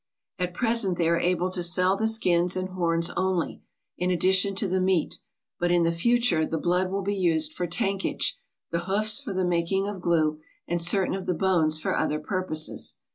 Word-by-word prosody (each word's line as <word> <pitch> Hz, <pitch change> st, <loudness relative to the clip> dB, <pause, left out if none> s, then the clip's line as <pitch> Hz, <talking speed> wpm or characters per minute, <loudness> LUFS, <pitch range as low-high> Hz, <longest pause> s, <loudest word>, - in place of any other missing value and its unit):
At 180 Hz, -1 st, -2 dB
present 225 Hz, -6 st, +1 dB
they 170 Hz, -, +1 dB
are 170 Hz, 0 st, +2 dB
able 180 Hz, +1 st, 0 dB
to 185 Hz, -, -2 dB
sell 180 Hz, +2 st, +2 dB
the 220 Hz, +2 st, 0 dB
skins 180 Hz, -5 st, +2 dB
and 185 Hz, 0 st, -3 dB
horns 170 Hz, -2 st, 0 dB
only, 185 Hz, -2 st, -2 dB, 0.4 s
in 180 Hz, -, 0 dB
addition 190 Hz, +2 st, +2 dB
to 200 Hz, +1 st, +1 dB
the 185 Hz, 0 st, 0 dB
meat, 185 Hz, -3 st, 0 dB, 0.4 s
but 175 Hz, -, +1 dB
in 175 Hz, -1 st, +3 dB
the 165 Hz, -, +2 dB
future 205 Hz, -1 st, +2 dB
the 160 Hz, -, -2 dB
blood 180 Hz, +3 st, 0 dB
will 195 Hz, +1 st, -3 dB
be 200 Hz, +2 st, -1 dB
used 160 Hz, -5 st, +1 dB
for 180 Hz, -, -3 dB
tankage, 195 Hz, +2 st, -1 dB, 0.4 s
the 170 Hz, +1 st, -2 dB
hoofs 210 Hz, +6 st, +2 dB
for 265 Hz, -7 st, -6 dB
the 185 Hz, -1 st, -1 dB
making 180 Hz, +3 st, 0 dB
of 205 Hz, -3 st, -6 dB
glue, 155 Hz, -3 st, +1 dB, 0.3 s
and 175 Hz, 0 st, -1 dB
certain 185 Hz, +3 st, +2 dB
of 190 Hz, 0 st, -5 dB
the 180 Hz, -, 0 dB
bones 165 Hz, -4 st, +2 dB
for -, -, -1 dB
other 150 Hz, -, 0 dB
purposes. 155 Hz, -2 st, -2 dB
180 Hz, 195 wpm, -26 LUFS, 170-195 Hz, 0.4 s, in